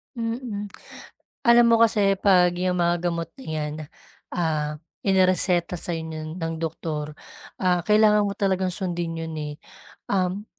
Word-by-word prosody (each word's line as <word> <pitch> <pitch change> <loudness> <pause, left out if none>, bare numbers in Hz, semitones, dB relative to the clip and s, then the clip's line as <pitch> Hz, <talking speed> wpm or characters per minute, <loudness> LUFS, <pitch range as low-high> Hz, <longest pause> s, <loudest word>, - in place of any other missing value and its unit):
Mhm. 230 -3 -4 0.8
Alam 235 0 +7
mo 230 - +6
kasi 205 -4 +3
'pag 180 -3 +5
'yong 180 0 0
mga 175 -1 +2
gamot 170 -1 -2
na 265 - -10
'yan, 155 -1 -3 0.6
ah, 155 -3 -1 0.3
inereseta 185 -2 +2
sa'yo 165 -1 -3 0.3
ng 165 -2 -3
doktor, 155 -2 -4 0.5
ah, 180 -1 +3
kailangan 210 -1 +5
mo 200 - -3
talagang 190 -2 0
sundin 175 -3 -2
'yon, 165 -1 -5
eh. 150 -1 -4 0.6
Um, 190 +1 0
180 Hz, 130 wpm, -24 LUFS, 165-200 Hz, 0.8 s, Alam